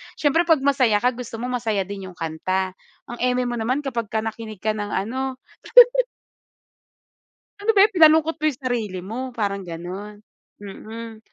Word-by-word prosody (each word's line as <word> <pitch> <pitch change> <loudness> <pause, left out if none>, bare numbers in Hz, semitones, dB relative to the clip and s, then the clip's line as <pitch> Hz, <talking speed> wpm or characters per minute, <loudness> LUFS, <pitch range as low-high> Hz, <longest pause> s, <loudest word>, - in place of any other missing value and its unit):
Siyempre 325 +4 +2
'pag 315 -5 +4
masaya 260 -6 +3
ka 250 - +4
gusto 240 -2 -8
mo 250 - -3
masaya 225 -5 0
din 195 0 -7
yung 185 - -12
kanta. 185 +4 -2 0.3
Ang 240 - -9
eme 250 0 +1
mo 240 -1 -3
naman 255 +6 -1
kapagka 230 -5 -2
nakinig 220 -2 -7
ka 215 - +2
ng 210 -1 -4
ano 260 +6 -2 2.3
Ano 445 +2 +2
ba 390 - +7
yan, 425 - +5
pinalungkot 320 -1 +5
mo 305 - -6
yung 290 -4 -1
sarili 225 -7 -2
mo, 215 +6 -6 0.2
parang 200 -3 -2
ganon. 185 +5 -7 0.4
Mm. 220 +3 -9
230 Hz, 160 wpm, -23 LUFS, 200-260 Hz, 2.3 s, ba